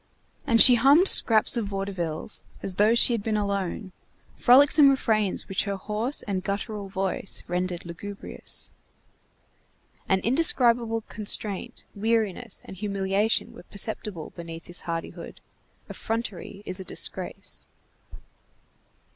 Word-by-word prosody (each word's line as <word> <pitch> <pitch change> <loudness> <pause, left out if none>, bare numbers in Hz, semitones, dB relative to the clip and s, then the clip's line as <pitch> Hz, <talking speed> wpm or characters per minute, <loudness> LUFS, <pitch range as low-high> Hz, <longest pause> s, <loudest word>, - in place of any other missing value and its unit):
And 230 - +3
she 250 - +9
hummed 275 +10 +5
scraps 220 - +4
of 225 -3 -1
vaudevilles, 195 -4 -2 0.2
as 195 - -1
though 215 +3 +4
she 240 +1 +4
had 230 - -1
been 215 +1 -1
alone, 200 -1 -3 0.4
frolicsome 280 +3 +6
refrains 220 -7 0
which 195 - 0
her 200 -1 -2
hoarse 215 +7 -2
and 195 -4 -3
guttural 200 0 -4
voice 190 0 -1
rendered 180 0 -3
lugubrious. 195 +4 -8 1.4
An 190 - +3
indescribable 235 - +2
constraint, 210 +1 -2
weariness, 220 -2 -2
and 190 - -10
humiliation 200 +1 -1
were - - -12
perceptible 200 -3 -3
beneath 165 -1 -8
this 175 0 -6
hardihood. 165 -1 -6 0.5
Effrontery 210 -3 -5
is 185 0 -4
a - - -6
disgrace. - - -4
205 Hz, 115 wpm, -25 LUFS, 190-230 Hz, 1.4 s, she